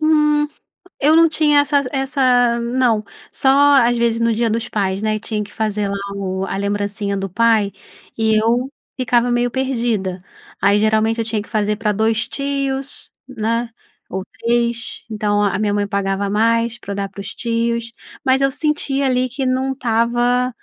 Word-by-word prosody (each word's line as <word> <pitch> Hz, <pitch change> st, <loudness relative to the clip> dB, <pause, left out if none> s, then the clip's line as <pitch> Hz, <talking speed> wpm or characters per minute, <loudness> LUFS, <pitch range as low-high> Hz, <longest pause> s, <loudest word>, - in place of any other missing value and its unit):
Hum, 300 Hz, -1 st, +3 dB, 0.5 s
eu 305 Hz, +3 st, +5 dB
não 330 Hz, 0 st, +6 dB
tinha 300 Hz, -2 st, +3 dB
essas 285 Hz, -2 st, +1 dB
essa 255 Hz, -3 st, +2 dB
não, 235 Hz, -3 st, +1 dB, 0.3 s
só 265 Hz, -, +1 dB, 0.3 s
às 240 Hz, +1 st, +2 dB
vezes 235 Hz, -1 st, +1 dB
no 230 Hz, 0 st, +2 dB
dia 230 Hz, +1 st, +1 dB
dos 225 Hz, +2 st, -1 dB
pais, 195 Hz, -1 st, -1 dB
né, 215 Hz, 0 st, 0 dB
e -, -, -6 dB
tinha 215 Hz, -1 st, -3 dB
que 205 Hz, -, -10 dB
fazer 210 Hz, -2 st, -1 dB
lá 200 Hz, -, -2 dB, 0.2 s
o 190 Hz, -1 st, -3 dB
a 195 Hz, -, -4 dB
lembrancinha 200 Hz, 0 st, -2 dB
do 195 Hz, 0 st, -3 dB
pai 215 Hz, 0 st, +2 dB, 0.4 s
e 220 Hz, -1 st, +2 dB
eu 240 Hz, +4 st, +1 dB, 0.3 s
ficava 245 Hz, -1 st, +2 dB
meio 240 Hz, 0 st, +1 dB
perdida, 235 Hz, -8 st, -1 dB, 0.4 s
aí 200 Hz, +1 st, +4 dB
geralmente 220 Hz, +1 st, +2 dB
eu 225 Hz, -, 0 dB
tinha 215 Hz, -2 st, -2 dB
que -, -, -16 dB
fazer 210 Hz, -1 st, 0 dB
pra 210 Hz, -1 st, 0 dB
2 220 Hz, +2 st, 0 dB
tios, 275 Hz, -1 st, -2 dB, 0.2 s
né, 230 Hz, 0 st, -2 dB, 0.4 s
ou 190 Hz, 0 st, -3 dB, 0.2 s
3. 235 Hz, 0 st, -1 dB
Então 210 Hz, -1 st, 0 dB
a 200 Hz, -2 st, +1 dB
a -, -, -1 dB
minha 210 Hz, -1 st, 0 dB
mãe 205 Hz, 0 st, 0 dB
pagava 200 Hz, 0 st, -1 dB
a 195 Hz, -, -3 dB
mais 230 Hz, +2 st, +1 dB
pra 200 Hz, -, -6 dB
dar 200 Hz, 0 st, -3 dB
para 195 Hz, +1 st, -10 dB
os 200 Hz, +2 st, -6 dB
tios, 235 Hz, 0 st, -1 dB, 0.3 s
mas 260 Hz, 0 st, +3 dB
eu 275 Hz, -, +3 dB
sentia 280 Hz, -1 st, 0 dB
ali 255 Hz, 0 st, +1 dB
que 265 Hz, +1 st, -3 dB
não 260 Hz, +1 st, 0 dB
estava 240 Hz, 0 st, +1 dB
230 Hz, 180 wpm, -19 LUFS, 210-255 Hz, 0.5 s, não